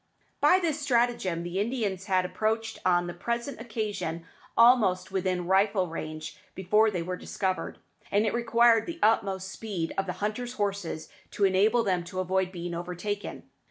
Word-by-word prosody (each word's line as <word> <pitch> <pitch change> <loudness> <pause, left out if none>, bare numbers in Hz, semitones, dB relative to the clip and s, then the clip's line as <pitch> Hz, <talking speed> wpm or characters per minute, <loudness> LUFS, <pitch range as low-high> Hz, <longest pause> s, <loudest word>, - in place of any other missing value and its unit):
By 370 - +6
this 325 -5 -1
stratagem 235 - +1
the 175 +2 -3
Indians 205 -4 -1
had 185 -2 +2
approached 220 +4 -1
on 175 -1 +3
the 175 - -5
present 235 +7 -3
occasion 210 -8 -3 0.3
almost 210 -7 +5
within 185 -2 -1
rifle 195 +1 +3
range 155 -2 -6 0.2
before 210 +4 +3
they 180 -5 -2
were 180 +2 -3
discovered, 190 +1 -3 0.3
and 205 +2 +2
it 215 - 0
required 235 -1 +4
the 335 - -5
utmost 195 -3 +2
speed 190 -6 -4
of 195 - -1
the 180 - -2
hunters' 215 +6 -3
horses 200 -7 -3 0.2
to 200 - +1
enable 205 +5 +3
them 185 -4 0
to 185 +2 -5
avoid 185 0 0
being 175 -1 -5
overtaken. 180 +4 -4
195 Hz, 160 wpm, -28 LUFS, 180-225 Hz, 0.3 s, By